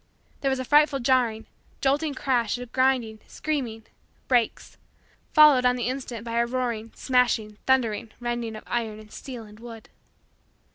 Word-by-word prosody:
There 275 - 0
was 265 - 0
a 260 - -3
frightful 295 0 +4
jarring, 240 -3 +1 0.3
jolting 285 +2 +1
crash 250 -4 0
of 245 -1 -9
grinding, 255 -4 +1
screaming, 250 -8 -3 0.4
brakes, 240 -4 0 0.5
followed 300 -4 +7
on 250 0 +3
the 245 -3 -2
instant 245 -3 -5
by 230 0 -1
a 235 - +3
roaring, 235 -3 -3
smashing, 240 -5 +1
thundering, 230 -4 +1
rending 240 -2 -3
of 215 - -9
iron 225 -3 -2
and 215 -1 -14
steel 250 -5 -8
and 210 0 -15
wood. 230 -1 -11
240 Hz, 150 wpm, -25 LUFS, 225-260 Hz, 0.5 s, followed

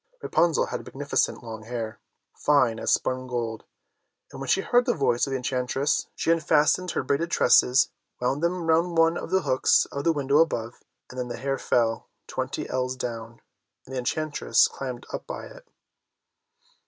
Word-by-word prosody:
Rapunzel 170 -2 +2
had - - -5
magnificent 140 -2 -1
long 110 -2 -7
hair, 110 -1 -5 0.4
fine 130 -6 +2
as - - 0
spun 130 0 0
gold, 115 -3 -4 0.7
and 135 - -9
when 135 - -5
she 195 - +3
heard 245 +4 +2
the - - +2
voice 130 -4 +1
of - - -5
the 135 - 0
enchantress 130 +2 -1
she 165 - +1
unfastened 165 +2 +2
her - - -1
braided 165 +4 0
tresses, 130 -3 +4 0.3
wound 130 +4 -1
them 170 0 -1
round 165 +1 +2
one 165 +1 +4
of - - -5
the 190 +1 +1
hooks 130 - +3
of 140 - -4
the 165 - +3
window 145 -1 +2
above, 120 -8 0 0.3
and 130 - -7
then 125 - -2
the 120 - -5
hair 135 +2 -2
fell 115 -2 0 0.2
twenty - - -4
ells 130 0 -2
down, 115 -2 -6 0.4
and 130 - -11
the 130 - -2
enchantress 155 +4 +2
climbed 130 -3 -6
up - - -5
by - - -6
it. - - -14
135 Hz, 175 wpm, -26 LUFS, 125-160 Hz, 0.7 s, tresses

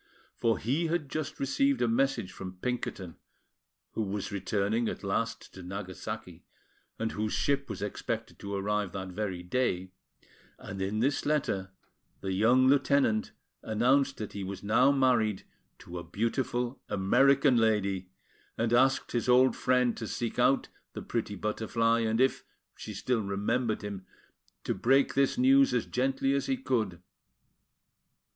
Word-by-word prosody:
For 115 -1 +1
he 145 +9 0
had 160 -3 -1
just 155 -1 -4
received 140 -1 +1
a 120 - +2
message 115 -4 +1
from 95 -1 -8
Pinkerton, 95 -6 -4 0.7
who - - -3
was 105 0 -3
returning 105 +3 0
at - - -6
last 115 +4 -2
to 95 - -10
Nagasaki, 95 0 -7 0.5
and 115 -1 -2
whose 105 0 -2
ship 140 -1 0
was - - -5
expected 115 +2 -4
to 100 0 -5
arrive 105 -1 -1
that 95 -1 -5
very 95 -2 -4
day; 95 -3 -1 0.7
and 95 -1 -7
in 100 +3 -1
this 135 +3 +1
letter 135 -11 0 0.5
the 95 -1 -2
young 120 +7 +4
lieutenant 135 -5 +2 0.3
announced 130 +5 +2
that 105 - -6
he 100 - -4
was 95 +1 -6
now 125 +6 +4
married 120 -7 +2 0.3
to 85 0 -8
a - - -7
beautiful 120 +6 -2
American 135 +7 +4
lady, 100 -5 +1 0.5
and 115 +1 0
asked 135 +2 +3
his 120 +1 -1
old 130 +1 +5
friend 125 -2 +2
to 110 - -5
seek 120 +2 -3
out 125 +2 +3 0.3
the - - -6
pretty 110 -3 -3
Butterfly, 115 +3 0
and 110 0 0
if 130 +1 +2 0.3
she - - -8
still 125 -3 0
remembered 105 +4 -1
him, 100 -2 -6 0.6
to - - -1
break 135 +3 +3
this 140 - +2
news 270 +2 +5
as - - +1
gently 135 +1 0
as 140 - 0
he 265 - 0
could. 110 - -2
115 Hz, 150 wpm, -29 LUFS, 100-130 Hz, 0.7 s, old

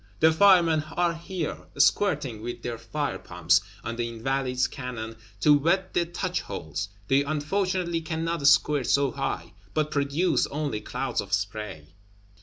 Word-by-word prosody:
The 160 - +6
Firemen 170 -3 +5
are 175 -1 +2
here, 170 -1 -5
squirting 145 - +2
with 120 +2 -6
their 120 -2 -4
fire 145 +6 -3
pumps 85 -1 +2 0.2
on 115 0 -4
the 120 -1 -1
Invalides 125 +2 0
cannon, 120 -4 -5 0.3
to 150 -1 +6
wet 180 +6 +1
the 170 -1 +1
touch 180 +1 -2
holes; 90 -1 -5 0.2
they 135 +3 +4
unfortunately 170 +3 -1
cannot 160 -2 -1
squirt 145 -2 +4
so 140 -2 +3
high; 90 -11 -3 0.2
but 150 -1 +1
produce 145 +5 +1
only 145 -7 -3
clouds - - -2
of - - -8
spray. 100 -7 -3
145 Hz, 145 wpm, -26 LUFS, 115-165 Hz, 0.3 s, The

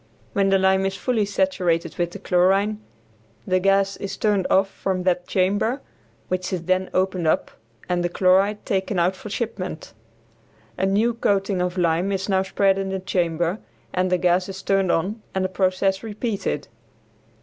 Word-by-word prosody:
When 195 -1 +2
the 195 - +4
lime 190 0 +3
is 195 - -3
fully 230 -3 0
saturated 195 -7 0
with 175 0 +1
the 175 - -8
chlorine 195 +3 +2 0.6
the 185 0 +2
gas 195 +1 +2
is 200 - -5
turned 205 -3 +1
off 195 +1 +4
from 190 -1 -3
that 180 -1 0
chamber, 205 +7 +1 0.5
which 185 0 -2
is 180 -3 -2
then 185 +1 0
opened 185 -2 0
up - - +1 0.4
and 180 -1 0
the 175 - 0
chloride 195 +4 +2
taken 190 0 -1
out 175 +2 +2
for 210 - -9
shipment. 195 -7 -4 0.8
A 190 +1 0
new 215 +5 +2
coating 195 -4 0
of 180 +1 -2
lime 175 +2 +1
is 195 -1 -2
now 190 -2 +2
spread 195 0 +2
in 195 0 -2
the 190 0 -2
chamber 175 0 -1 0.3
and 185 0 0
the 180 - +4
gas 180 +1 +2
is 195 0 -7
turned 195 -2 +2
on 200 +7 -1
and 190 0 +1
the - - -1
process 190 +1 +1
repeated. 210 - -3
190 Hz, 170 wpm, -23 LUFS, 180-200 Hz, 0.8 s, the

